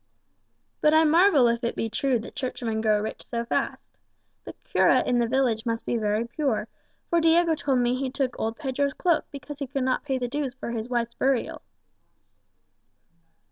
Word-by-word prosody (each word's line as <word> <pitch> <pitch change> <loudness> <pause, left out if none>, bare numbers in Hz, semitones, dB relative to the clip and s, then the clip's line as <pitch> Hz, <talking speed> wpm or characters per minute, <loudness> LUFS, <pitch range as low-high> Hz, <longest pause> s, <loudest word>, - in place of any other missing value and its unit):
"But 305 +1 +4
I 320 - +6
marvel 320 -4 +5
if 235 +1 0
it 235 - -1
be 225 - -2
true 250 +3 0
that 225 - -10
churchmen 230 -4 -3
grow 215 -1 +3
rich 215 +1 -5
so 235 0 -4
fast. - - -2 0.6
The - - -8
cura - - +3
in 245 - +1
the 235 - +2
village 245 -3 +1
must 230 -1 -3
be - - -1
very 215 0 0
poor, 235 -3 -2 0.4
for 340 -1 +3
Diego 330 +1 +4
told 280 -4 0
me 245 0 +2
he 260 +1 -2
took 260 -1 -2
old 225 +1 -2
Pedro's 280 -1 -1
cloak 340 -3 +1
because 285 0 -9
he 280 - -3
could 275 0 -2
not 255 0 0
pay 270 -3 -1
the 250 -1 -2
dues 270 0 -3
for 255 - -6
his 230 0 -4
wife's 235 -1 -1
burial." 265 -3 -1
255 Hz, 185 wpm, -26 LUFS, 235-285 Hz, 0.6 s, I